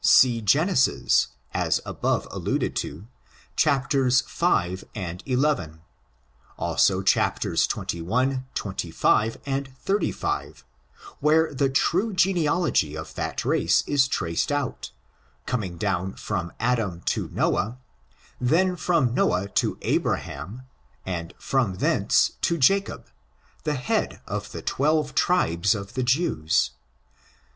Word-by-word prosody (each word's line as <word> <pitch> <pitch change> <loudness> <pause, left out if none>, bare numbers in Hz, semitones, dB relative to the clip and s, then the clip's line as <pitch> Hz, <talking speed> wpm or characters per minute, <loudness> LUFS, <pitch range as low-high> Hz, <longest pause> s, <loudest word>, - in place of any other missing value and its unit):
See 120 -3 +5
Genesis, 135 - +3 0.3
as - - +1
above - - -1
alluded - - -2
to, 85 +7 -4 0.5
v 135 - +1
and 90 -4 -5
xi; 125 - +2 1.2
also, 95 0 +2
chapters 100 - +2
xxi, 85 -1 -3 0.5
xxv 110 +2 0
and 135 0 -2 0.2
xxxv, 200 +2 -2 0.6
where 160 0 +3
the 135 0 +1
true 185 +10 +1
genealogy 170 - +1
of 80 - -8
that - - -3
race - - +2
is 140 -2 +3
traced 85 - -1
out, 145 -2 -2 0.6
coming 95 -8 -3
down 90 +2 -1
from 85 -1 -3
Adam 115 -7 0
to - - -2
Noahj 115 +5 0 0.6
then 180 +9 +2
from 160 -8 +1
Noah 95 -5 +1
to - - 0
Abraham^ 95 - -2 0.4
and 85 -2 -5
from 125 -9 0
thence - - +2
to 170 - +1
JaoiAf 195 +8 +2 0.6
the 150 -1 0
head 125 -2 -1
of - - -5
the - - -7
twelve 150 +1 +1
tribes 100 - +2
of 100 -1 -7
the 130 - -1
Jews. 120 - +1
125 Hz, 110 wpm, -25 LUFS, 95-150 Hz, 1.2 s, See